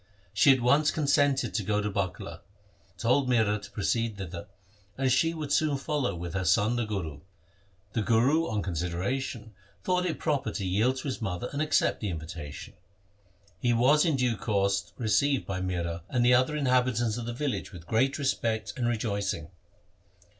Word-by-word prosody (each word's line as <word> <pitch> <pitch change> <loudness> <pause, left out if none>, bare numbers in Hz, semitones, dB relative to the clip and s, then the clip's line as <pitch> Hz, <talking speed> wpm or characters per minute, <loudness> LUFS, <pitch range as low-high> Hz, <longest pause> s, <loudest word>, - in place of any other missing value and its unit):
She 105 +7 +6
at 130 -2 +3
once 140 +5 +4
consented 145 -2 +2
to 110 - 0
go 105 +2 0
to 105 - -1
Bakala, 95 -3 -4 0.6
told 125 +3 +2
Mihra 105 -4 +2
to 100 - -10
proceed 115 +1 -1
thither, 90 -3 -7 0.5
and 135 -1 +1
she 130 +6 +3
would 150 -3 -5
soon 150 -2 +2
follow 135 - -1
with 85 0 -6
her 95 -1 -1
son 105 +7 +3
the 120 -1 0
Guru. 85 -9 -4 0.7
The 115 - 0
Guru, 130 +10 +3
on 105 -2 -2
consideration, 100 - -3 0.3
thought 180 0 +1
it 165 - -2
proper 150 -4 -1
to 100 - -3
yield 105 +8 +2
to - - -5
his 135 -4 -4
mother 95 +3 -3
and 145 - -1
accept 155 -1 +2
the 105 - -2
invitation. 80 -3 -7 0.9
He 120 +2 +2
was 130 +6 +4
in 160 -4 +2
due 125 -4 +1
course 100 -2 0
received 125 +4 +1
by 95 -1 -3
Mihra 85 -2 -2
and 120 -1 +1
the 125 - +6
other 130 +5 +3
inhabitants 125 -5 +1
of 120 -1 -5
the - - -2
village 135 -2 -3
with 85 -4 -11
great 130 +8 +1
respect 110 -7 -1
and 120 -2 -1
rejoicing. 100 -8 -2
115 Hz, 175 wpm, -28 LUFS, 100-135 Hz, 0.9 s, She